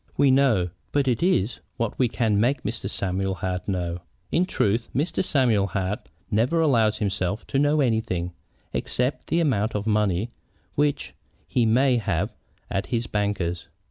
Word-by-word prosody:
"We 140 -1 +5
know. 120 -10 +3 0.2
But 140 -2 +1
it 125 -3 +1
is 150 - +1 0.2
what 115 -2 -2
we 130 - +4
can 110 -3 +1
make 125 +4 +1
Mr. 100 -1 -3
Samuel 95 -1 -1
Hart 90 -1 -3
know. 90 -3 -2 0.3
In 180 +2 +2
truth, 115 - 0
Mr. 150 +9 0
Samuel 120 - +2
Hart 100 +4 -3 0.2
never 120 +10 +2
allows 115 -9 +3
himself 100 0 -1
to 135 - 0
know 145 +1 +3
anything, 110 -8 0 0.4
except 125 +3 -1
the 170 - +1
amount 115 -10 +1
of 105 0 -1
money 105 0 +1 0.4
which 145 0 0 0.3
he 120 -2 +2
may 125 +3 +4
have 115 - -1 0.3
at 95 +1 -2
his 120 -1 -1
banker's. 95 -6 -2
110 Hz, 155 wpm, -25 LUFS, 100-130 Hz, 0.4 s, We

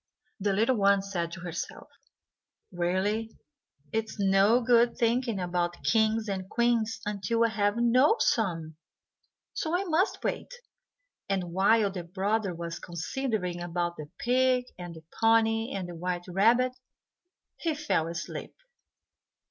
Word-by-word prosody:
The 200 +1 +1
little 225 +5 +2
one 200 -1 +4
said 175 -4 -3
to 175 - -8
herself, 175 0 -6 0.8
"Really, 190 +5 -1 0.5
it 220 0 0
is 220 - -11
no 200 +3 +4
good 235 0 +3
thinking 235 -2 +1
about 175 -1 -2
kings 220 0 +2
and 190 -2 -4
queens 235 -2 +1
until 210 +3 0
I - - +2
have 205 0 0
known 250 - +4
some, 165 -8 0 0.8
so 320 +2 -1
I 380 - -1
must 365 +2 0
wait;" - - -3 0.8
and 185 -3 -1
while 200 +2 +3
the 180 -2 -5
brother 195 +2 -1
was 170 0 -5
considering 180 0 -3
about 175 0 -2
the 150 -1 -8
pig, 255 0 +2
and 175 -2 -8
the 160 - -12 0.2
pony, 225 +1 +3
and 190 -2 -4
the 175 - -7
white 175 +1 -3
rabbit, 230 +8 +3 0.9
he 325 -3 -1
fell 295 - 0
asleep. 170 0 -6
205 Hz, 135 wpm, -28 LUFS, 175-230 Hz, 0.9 s, one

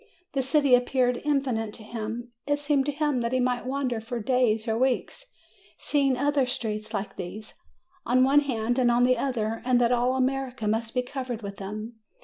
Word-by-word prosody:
The 275 - +1
city 275 0 +2
appeared 250 0 +3
infinite 260 -7 0
to 220 - -9
him; 230 +2 -5 0.2
it 290 - +3
se'emed 290 -2 +1
to 290 - 0
him 290 -3 0
that 235 +1 -2
he 255 - +2
might 250 0 0
wander 260 -4 -1
for 235 +2 -4
days 230 -1 +1
or 220 - +1
weeks, 260 - -1 0.5
seeing 275 -3 +1
other 285 -1 +2
streets 215 -3 -3
like 205 -2 -4
these, 200 +4 -7 0.5
on 255 +1 +3
one 275 +2 +5
hand 245 -3 -1
and 245 -1 +4
on 240 +1 +3
the 255 0 +4
other, 225 -4 -1
and 250 -1 +3
that 240 0 +3
all 250 +1 +2
America 260 -3 -1
must 225 +2 -1
be 250 - +2
covered 250 -3 -5
with 200 -1 -6
them. 215 +3 -7
245 Hz, 190 wpm, -26 LUFS, 225-265 Hz, 0.5 s, one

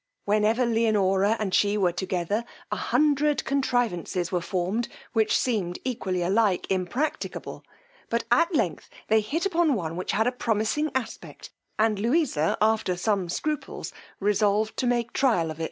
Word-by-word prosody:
Whenever 215 +4 +2
Leonora 215 -3 +2
and 205 -4 -3
she 205 0 +3
were 185 -4 +2
together, 185 +4 -2 0.3
a - - 0
hundred 295 0 +1
contrivances 235 - 0
were 180 -2 0
formed, 190 +6 -1 0.3
which 220 -2 +3
seemed 195 -8 -1
equally 190 -8 -2
alike 195 0 +2
impracticable; 245 - -3 0.5
but 235 0 0
at 335 +9 +4
length 180 - -1 0.2
they 220 0 +4
hit 305 - -2
upon 340 -6 +2
one 165 -5 -3
which 180 - -3
had 220 - +2
a 245 - +2
promising 235 +5 0
aspect 260 -3 -5 0.3
and 215 -2 +2
Louisa, 235 - +1
after 215 -4 +1
some 195 -2 0
scruples, 300 - -3 0.3
resolved 210 +1 +1
to 255 - 0
make 240 -1 0
trial 180 -12 +2
of. 155 - -9
215 Hz, 145 wpm, -26 LUFS, 185-245 Hz, 0.5 s, at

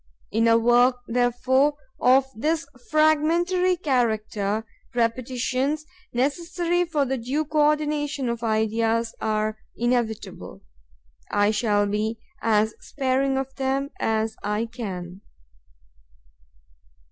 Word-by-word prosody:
In 225 +2 +2
a 230 0 +6
work, 240 +2 +4
therefore, 250 +4 +2 0.2
of 260 +2 +5
this 310 +7 0 0.2
fragmentary 335 +4 +3
character, 220 - 0 0.3
repetitions, 255 +5 0 0.3
necessary 340 +7 0
for 305 -4 0
the 265 0 -2
due 275 +7 -1
co 300 0 +3
ordination 295 -3 0
of 235 -1 -2
ideas, 225 +1 +1
are 215 0 -1 0.2
inevitable. 240 -2 -2 0.7
I 205 +1 +3
shall 210 -1 +2
be 210 +2 -1 0.2
as 220 -1 +2
sparing 270 0 0
of 270 0 -3
them 270 +1 -1
as 220 0 0
I 210 +2 -1
can. 190 -6 -7
245 Hz, 100 wpm, -24 LUFS, 220-290 Hz, 0.7 s, a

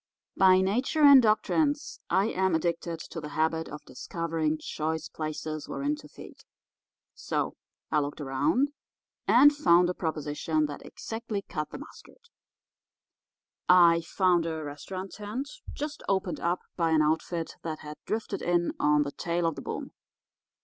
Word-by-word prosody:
"By 185 -1 +6
nature 245 +10 +1
and 280 -2 +10
doctrines 285 +7 +1
I 190 +1 +3
am 190 -4 +1
addicted 170 0 -2
to 165 0 -7
the 150 - -6
habit 160 +1 0
of 150 0 -9
discovering 160 +3 -2
choice 160 +1 -3
places 155 -1 -5
wherein 290 +2 -1
to - - -12
feed. - - -12 0.8
So - - -2 0.4
I 155 - +3
looked 145 +1 -3
around 145 - +1 0.6
and 290 +4 +7
found 180 - +4
a - - -4
proposition 155 -1 -1
that 145 -1 -7
exactly 220 -3 -5
cut 150 -5 -4
the - - -7
mustard. 470 - -14 1.4
I 170 -2 +7
found 175 -1 +2
a 160 -1 -3
restaurant 185 +6 -6
tent 215 +7 -5 0.2
just 300 +1 -5
opened 190 -2 0
up 175 +1 0
by 165 -2 +1
an 160 -1 +4
outfit 160 +2 -1
that 160 -2 -5
had 150 0 -8
drifted 215 -2 -2
in 175 0 +1
on 150 0 +4
the 140 - -5
tail 170 +2 -2
of 165 - +1
the - - -8
boom. - - -5
170 Hz, 150 wpm, -28 LUFS, 155-205 Hz, 1.4 s, and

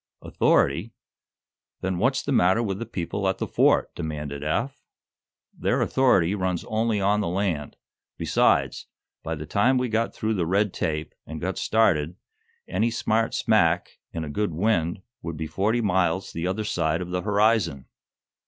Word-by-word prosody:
"Authority? 85 +11 +1 0.9
Then 95 -1 -2
what's 130 +6 +1
the 140 - -3
matter 110 -2 +3
with 100 -3 -2
the 115 - -5
people 95 -1 -3
at 95 - -1
the - - -2
Fort?" - - +2
demanded 75 -3 -5
Eph. 100 - -2 0.7
"Their - - 0
authority 100 -9 +3
runs 95 -3 -2
only 110 -1 0
on 100 +2 +2
the 100 - -1
land. 85 -5 -2 0.4
Besides, - - +1 0.3
by 80 - -3
the 75 0 -7
time 125 - +2
we 125 -1 0
got 115 +1 0
through 110 +1 -2
the 90 -5 -1
red 100 +2 +1
tape, 75 -2 -3
and 80 0 -6
got 95 +4 -3
started, 90 -8 +2 0.5
any 115 - +1
smart 115 -1 0
smack, 90 -5 +2
in 80 - -4
a 75 - -5
good 100 0 -1
wind, 90 -2 0 0.2
would 85 -1 -5
be 80 - -3
forty 105 +8 0
miles 95 -3 +1
the 85 +2 -3
other 100 +4 -1
side 80 -3 0
of 90 - -8
the 90 0 -1
horizon." 100 - +1
95 Hz, 160 wpm, -25 LUFS, 80-110 Hz, 0.9 s, matter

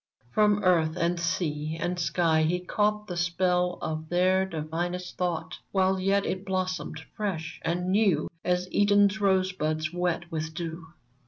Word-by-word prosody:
From 210 +2 +3
earth 170 -3 +3
and 170 0 0
sea 160 -3 -1
and 180 +1 -2
sky 165 -2 +2
he 170 +3 +1
caught 210 +3 0
The 180 -4 -5
spell 180 0 +1
of 155 0 -4
their 185 +2 +3
divinest 175 +2 -4
thought, 165 -3 -2
While 190 -1 +2
yet 195 +1 +2
it 185 0 -2
blossomed 185 -1 -2 0.2
fresh 165 -6 -3
and 180 +2 -1
new 195 -7 +3 0.2
As 180 0 0
Eden's 205 +1 +4
rosebuds 185 -5 +1
wet 175 -1 -1
with 160 0 -4
dew 165 -1 -5
180 Hz, 145 wpm, -27 LUFS, 165-190 Hz, 0.2 s, Eden's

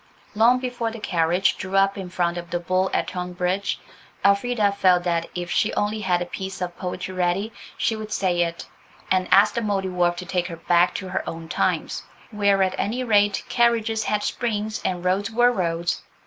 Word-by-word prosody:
Long 230 +4 +5
before 245 -2 -2
the 225 0 -8
carriage 175 0 +1
drew 190 +1 -5
up 195 0 +3
in 190 -2 -6
front 175 -1 0
of 175 -1 -6
the 175 - -1
"Bull" 185 +2 0
at - - 0
Tonbridge, 180 +2 -2 0.5
Elfrida 205 +1 +3
felt 185 -3 +3
that 170 -1 0
if 175 -1 -4
she 215 - +2
only 210 +1 0
had 180 -3 +1
a - - -7
piece 190 +2 -6
of 175 -1 -4
poetry 185 0 -5
ready 185 +4 0 0.2
she 225 - +1
would 215 0 -7
say 180 -4 +1
it, 170 0 -2 0.5
and 185 -1 +2
ask 200 +2 +6
the 235 - -1
Mouldiwarp 185 -4 0
to 180 - -6
take 180 -1 -1
her 170 -2 -7
back 175 +1 +3
to 190 -2 -4
her 185 - -2
own 165 0 -7
times, - - -1 0.3
where, 200 -2 +3
at 185 0 0
any 245 +5 -1
rate, 205 -4 +3
carriages 230 -2 +2
had 210 -1 0
springs 215 -3 -2
and 180 -1 -2
roads 195 +3 +1
were 240 +2 +4
roads. 170 -5 -1
190 Hz, 190 wpm, -23 LUFS, 180-210 Hz, 0.5 s, ask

